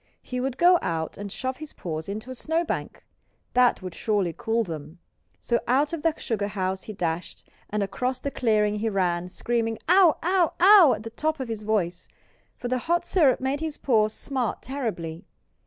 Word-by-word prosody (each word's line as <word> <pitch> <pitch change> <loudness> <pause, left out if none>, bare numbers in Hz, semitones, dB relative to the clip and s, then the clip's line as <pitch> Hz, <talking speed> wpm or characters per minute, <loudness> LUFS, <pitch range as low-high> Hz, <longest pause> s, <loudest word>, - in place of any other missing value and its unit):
He 250 - -4
would 260 -1 -2
go 350 +2 +6
out 160 -1 -2
and 200 -1 -7
shove 260 +5 -4
his 310 -1 -9
paws 160 0 -5
into 215 +5 -5
a - - -4
snowbank. 320 +6 -2 0.5
That 250 -5 +3
would 185 -2 -6
surely 205 -6 0
cool 230 0 0
them. 160 -2 -7 0.4
So 235 - 0
out 285 +5 +2
of 330 - -3
the 325 0 +1
sugar 210 -3 -2
house 190 -2 -2
he 215 - -6
dashed 170 -2 -4 0.2
and 210 0 0
across 250 +6 -2
the 280 - -3
clearing 210 -4 +1
he 225 +1 0
ran, 180 -3 0
screaming 225 +3 -1
"Ough! 360 -2 +6
ough! 360 -1 +2
ough!" 370 -7 +8
at 215 - -9
the 225 - -7
top 310 +5 -1
of 260 -3 -4
his 220 -2 -4
voice, 200 -5 -1 0.5
for 245 - -5
the 255 +1 0
hot 345 +7 0
syrup 295 -9 +3
made 265 +2 -1
his 315 -1 -4
paws 215 -5 +2
smart 255 -1 -3
terribly. 210 - -4
230 Hz, 190 wpm, -25 LUFS, 200-280 Hz, 0.5 s, ough